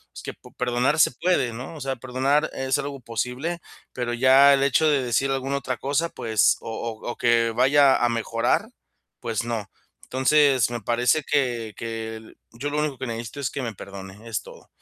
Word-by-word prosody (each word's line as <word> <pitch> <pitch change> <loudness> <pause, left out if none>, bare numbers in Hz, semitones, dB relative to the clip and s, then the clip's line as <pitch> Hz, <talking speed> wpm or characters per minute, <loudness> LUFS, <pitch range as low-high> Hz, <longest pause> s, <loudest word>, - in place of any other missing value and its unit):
es - - -9
que - - -5
po - - -18
perdonar 125 +4 0
se 155 - +5
puede, 130 -2 0
¿no?, 130 +7 -8
o 155 - -9
sea, 135 0 -3
perdonar 130 +4 0
es 135 0 0
algo 140 -1 -5
posible, 125 +9 -3 0.3
pero 120 -1 -3
ya 130 +3 +6
el 135 - +2
hecho 140 +3 +3
de 145 -4 +2
decir 125 +3 +1
alguna 135 +1 -1
otra 130 -2 -3
cosa, 145 +6 0
pues 110 -7 +2
o - - -7
o 115 +1 -5
o - - -9
que 115 -1 +3
vaya 135 +3 +4
a 120 - +2
mejorar, 115 - 0 0.5
pues, 115 -3 -2
no, 115 -4 -4 0.3
entonces, 130 -2 +3
me 120 - -3
parece 120 +7 +1
que 120 -7 0
que 110 -1 -6 0.2
yo 125 +5 -4
lo 150 +1 -1
único 150 -3 -1
que 130 - -5
necesito 115 +4 -6
es 130 - -1
que 140 - -5
me 115 -4 -4
perdone, 100 +3 -10
es 110 - -2
todo. - - -14
125 Hz, 195 wpm, -24 LUFS, 115-140 Hz, 0.5 s, ya